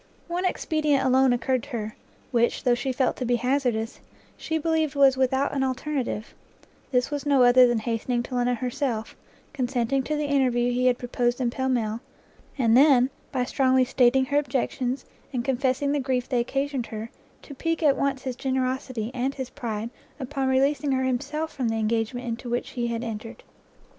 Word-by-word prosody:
One 355 +2 -2
expedient 305 -6 +1
alone 260 0 +4
occurred 250 +1 +1
to 285 - -12
her, 220 -4 -4 0.4
which, 235 -1 +1
though 245 - +4
she 245 +2 -1
felt 255 0 0
to - - -3
be 245 0 +2
hazardous, 245 -2 -1 0.4
she 320 - -2
believed 315 -2 0
was 275 -2 +5
without 265 +1 +1
an 275 - 0
alternative; 260 -4 -3 0.6
this 250 +2 +1
was 290 -1 -2
no 280 -3 +4
other 250 +1 +7
than 240 -1 +1
hastening 235 +2 -1
to 255 - -9
London 245 0 +1
herself, 240 -2 -3 0.4
consenting 255 -1 0
to 305 +3 -2
the 300 0 -1
interview 250 -4 +2
he 250 +1 +1
had 250 -1 +3
proposed 245 0 -1
in 245 -2 0
Pall 260 +1 -2
Mall, 225 -3 0 0.6
and 230 -4 +3
then, 265 -1 +6 0.2
by 255 -2 0
strongly 260 0 +2
stating 260 +1 +3
her 285 +2 +2
objections, 260 -1 -2 0.3
and 245 -2 -2
confessing 265 +1 +1
the 290 - +1
grief 255 -2 -1
they 250 -3 +1
occasioned 270 +1 -2
her, 220 +1 -6 0.3
to 285 - -10
pique 330 +4 -2
at 285 -3 +5
once 275 -2 -1
his 255 -2 -3
generosity 255 -3 -2
and 260 +2 -1
his 260 -2 -5
pride 225 -1 -4 0.3
upon 270 0 -2
releasing 275 +2 +2
her 260 0 +1
himself 290 +5 -2
from 255 -4 -2
the 225 - -1
engagement 225 +3 -1
into 240 +1 -4
which 240 +1 -2
he 240 -1 -2
had 230 0 -3
entered. 225 -1 -7
255 Hz, 185 wpm, -25 LUFS, 240-275 Hz, 0.6 s, other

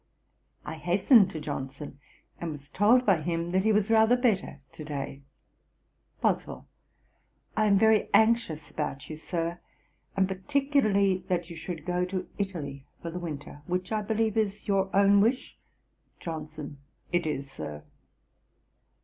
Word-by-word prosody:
I 160 +2 -5
hastened 185 - +5
to 160 - -6
Johnson, 140 -1 -6 0.4
and 170 - -3
was 145 -1 -9
told 230 - +4
by 190 -6 +4
him 170 +1 -2
that 190 +1 +3
he 220 - +3
was 210 +1 +2
rather 225 +2 +5
better 220 - 0
to 155 - -9
day. 140 -2 -5 1.0
BOSWELL. - - -1 0.9
'I 215 - +3
am 200 -1 +5
very 220 +1 +4
anxious 220 -10 +2
about 145 -1 -4
you, - - -4
Sir, 170 +2 -3 0.6
and 190 -1 +3
particularly 200 -3 +1
that 175 -1 -1
you - - -7
should 165 0 -6
go 180 0 0
to 185 0 -4
Italy 150 -9 -4 0.2
for 170 - -4
the 180 - -5
winter, 145 -3 -7
which 180 +2 -2
I 215 -1 +1
believe 220 +1 0
is 210 -1 -1
your 195 -1 +2
own 200 0 +6
wish.' 240 +5 0 0.6
JOHNSON. 155 -3 -7 0.3
'It 175 -2 +1
is, 140 -2 -3
Sir.' 75 - -7
180 Hz, 145 wpm, -28 LUFS, 155-210 Hz, 1.0 s, own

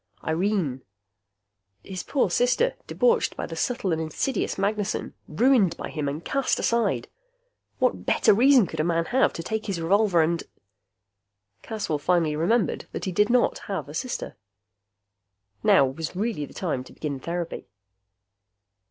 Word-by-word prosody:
Irene! 165 -5 0 1.0
His 185 -1 -5
poor 260 -10 0
sister, 250 - +2
debauched 485 -1 +2
by - - -3
the - - -7
subtle 240 -7 -1
and 160 0 0
insidious 160 - -2
Magnessen, 205 +1 -1
ruined 200 - +3
by - - -5
him 150 -2 -3
and 150 +4 -6
cast 275 -1 0
aside. 235 0 0 0.7
What - - +1
better - - +4
reason 255 +1 +6
could 160 -2 -7
a - - +3
man 165 0 +1
have 260 +7 +2
to 165 - -5
take 220 +4 -3
his 190 -4 -2
revolver 185 0 +3
and.... 165 +1 0 1.2
Caswell 200 -9 -3
finally 165 -1 +1
remembered 185 +7 0
that - - -4
he 190 - -2
did 210 +5 +2
not 245 0 +2
have 185 -9 -3
a 145 - -9
sister. 245 +10 -4 1.3
Now 135 - +5
was 155 +6 -5
really 200 -7 -2
the - - -15
time 155 -9 -2
to - - -14
begin 145 -3 -4
therapy. 170 +3 -4
185 Hz, 150 wpm, -25 LUFS, 160-225 Hz, 1.3 s, reason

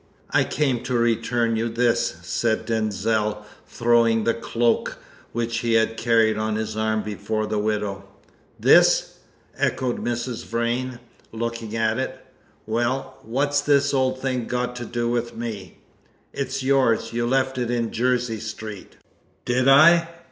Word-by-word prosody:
"I - - +3
came 135 -5 0
to 125 0 -1
return 115 0 +1
you 115 +1 -1
this," 120 +1 +1
said 115 -2 -1
Denzil, 105 -1 -1 0.2
throwing 115 -1 +2
the 115 - +2
cloak 115 0 0 0.3
which 115 0 -2
he 115 0 0
had 115 0 +2
carried 115 -2 +2
on 110 0 -1
his 110 0 -3
arm 110 0 0
before 105 +1 -3
the 105 0 -1
widow. 105 -2 -2 0.5
"This?" - - +4 0.4
echoed 125 -2 -1
Mrs. 120 0 -3
Vrain, 120 +2 -2 0.3
looking 115 -1 -4
at 115 +1 +1
it. 130 - -3 0.5
"Well, 120 +4 -2
what's 140 +5 0
this 140 -1 +2
old 130 -1 +1
thing 130 -3 -2
got 125 0 -2
to 120 - -5
do 120 +1 -2
with 120 0 -2
me?" 110 -5 -6 0.6
"It's 135 0 -3
yours; 130 -4 +2
you 120 0 0
left 130 0 +1
it 120 -1 -1
in 120 -2 -1
Jersey 120 -2 0
Street!" 110 -2 -8 0.5
"Did 125 +2 +1
I? 165 +5 +7
115 Hz, 140 wpm, -23 LUFS, 110-125 Hz, 0.6 s, I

